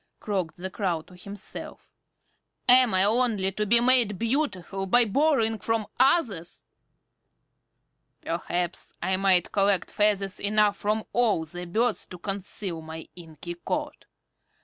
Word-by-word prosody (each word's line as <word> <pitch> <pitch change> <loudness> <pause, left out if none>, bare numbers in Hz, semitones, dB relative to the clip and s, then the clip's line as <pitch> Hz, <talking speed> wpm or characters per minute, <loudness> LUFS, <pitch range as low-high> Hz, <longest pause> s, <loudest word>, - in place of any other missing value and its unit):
croaked 185 -7 -3
the 185 +1 -5
Crow 175 -5 -2
to 180 - -17
himself. 200 +2 -9 0.8
"Am 250 -1 +7
I 185 0 +4
only 215 -3 +2
to 210 +2 -2
be 235 +3 +6
made 240 -5 +4
beautiful 210 - -2
by 240 +5 +5
borrowing 225 -2 +1
from 225 +2 -1
others? 245 - +1 1.6
Perhaps 175 +1 -3
I 190 - +1
might 190 -2 +3
collect 195 -2 +1
feathers 200 -2 +1
enough 210 0 +2
from 215 +1 -1
all 220 -9 +1
the 175 +3 -8
birds 220 +6 -1
to 180 - -10
conceal 195 -2 -5
my 160 0 -9
inky 170 0 -8
coat. - - -4
200 Hz, 125 wpm, -26 LUFS, 180-225 Hz, 1.6 s, Am